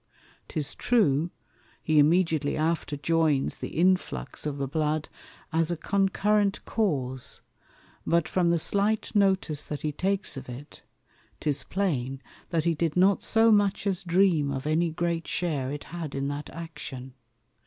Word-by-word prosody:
'Tis 145 -2 -2
true, 170 - +2 0.5
he 155 -1 +3
immediately 160 -1 +3
after 155 -2 -1
joins 155 -1 +1
the - - -6
Influx 180 -3 +1
of 145 -1 -3
the 140 -1 -2
Blood 155 +2 -1 0.4
as 165 0 +2
a 175 - -1
concurrent 200 +3 +1
Cause; 130 - -1 0.6
but 170 -1 +2
from 180 -2 +1
the 170 - +3
slight 205 +7 0
notice 190 -7 +1
that 150 - -5
he 155 - 0
takes 195 0 -1
of 130 -1 -8
it, 135 +5 -10 0.6
'tis 145 -3 -1
plain, 135 -9 -1 0.3
that 165 -3 0
he 170 0 +2
did 165 0 -1
not 190 +2 +4
so 225 +1 +4
much 205 -1 +2
as 195 -3 0
dream 175 -5 +3
of 135 0 -3
any 160 +3 +2
great 170 0 -2
share 150 -7 -1
it 145 0 -5
had 165 -5 -6
in 140 0 -1
that 145 +1 -5
Action. 140 -6 -8
165 Hz, 150 wpm, -27 LUFS, 145-185 Hz, 0.6 s, not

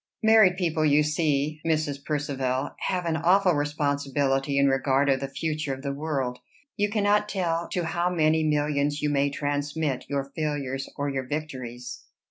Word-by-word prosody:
Married 220 -5 +6
people, 165 -4 0
you 150 0 +4
see, 150 -1 0
Mrs. 155 -3 -1
Percivale, 135 -3 -2 0.2
have 180 -2 -1
an 165 -1 0
awful 180 +3 +4
responsibility 145 -2 0
in 140 0 +4
regard 135 +1 +2
of 135 - +1
the 135 - -3
future 155 0 -3
of 135 - -12
the 140 -1 -2
world. 140 -4 -2 0.4
You 205 0 +1
cannot 210 0 +2
tell 170 -4 -1
to 180 - -1
how 170 +2 0
many 160 -2 +2
millions 145 -1 0
you 150 - +1
may 140 0 +2
transmit 145 -1 -2
your 140 -1 -2
failures 140 -4 -2
or 145 0 -1
your 135 -1 -3
victories." 130 -5 -5
145 Hz, 160 wpm, -26 LUFS, 140-160 Hz, 0.4 s, Married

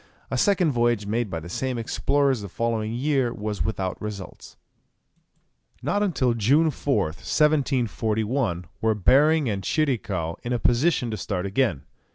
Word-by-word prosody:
A - - 0
second 190 -6 +3
voyage 120 -4 +1
made 110 +2 -1
by 85 -3 -3
the 80 - -10
same 130 +7 -3
explorers 135 +2 +1
the 100 - -7
following 110 +1 -1
year 130 0 0
was 105 -2 -3
without 95 -4 -3
results. 105 -3 -8 1.3
Not 205 - 0
until 140 -11 +1
June 140 +9 +3
4th, 100 - -1
1741, 120 - 0 0.2
were 110 -1 +2
Behring 145 - +4
and 100 -3 -1
Tschirikow 100 - -1
in 120 - -3
a - - +2
position 120 +1 +1
to 110 - -3
start 90 -1 -3
again. 100 - 0
115 Hz, 145 wpm, -24 LUFS, 105-140 Hz, 1.3 s, Behring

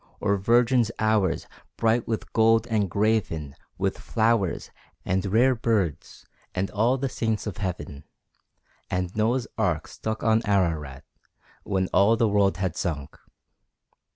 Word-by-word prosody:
Or 100 -1 +1
Virgin's 120 +3 +3
Hours, 110 -3 +1 0.3
bright 115 +1 +1
with 110 -1 -4
gold 115 0 +4
and 110 -5 0
graven 100 -8 0 0.2
With - - -1
flowers, 110 -5 0 0.3
and 95 0 0
rare 120 +7 +4
birds, 105 - -2 0.3
and 95 +1 -1
all 115 +5 +2
the 135 +1 -1
Saints 110 -4 -2
of 105 -5 -5
Heaven, 75 -7 -5 0.8
And 90 0 -2
Noah's 115 +3 +1
ark - - 0
stuck 110 0 -5
on 110 0 +3
Ararat, 80 -10 0 0.6
when 95 -2 -1
all 110 +4 +4
the 115 -1 +3
world 100 -2 +2
had 95 -4 -2
sunk. 75 -6 -4
105 Hz, 130 wpm, -25 LUFS, 95-115 Hz, 0.8 s, gold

